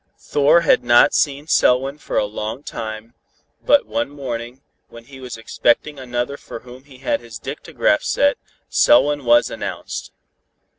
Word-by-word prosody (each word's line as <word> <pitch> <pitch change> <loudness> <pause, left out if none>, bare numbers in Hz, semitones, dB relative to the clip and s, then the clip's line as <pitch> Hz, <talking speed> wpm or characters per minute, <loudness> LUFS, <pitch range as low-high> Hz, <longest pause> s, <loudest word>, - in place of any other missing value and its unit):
Thor 145 +4 +3
had - - +3
not 120 0 +5
seen 145 0 0
Selwyn 135 -1 +2
for - - -4
a - - +2
long 110 +5 -5
time, 110 -1 -7 0.5
but 290 - +4
one 290 - -2
morning, 125 -2 -6 0.3
when 115 0 -13
he 135 +2 -14
was 125 -3 -8
expecting 120 +5 0
another 125 +2 -3
for 115 - -10
whom 125 +2 -14
he 135 -3 -16
had 130 -1 -2
his 115 -3 -10
dictagraph 150 - -1
set, 285 0 +1 0.3
Selwyn 145 - +3
was 120 0 +4
announced. - - -6
130 Hz, 150 wpm, -20 LUFS, 120-145 Hz, 0.5 s, not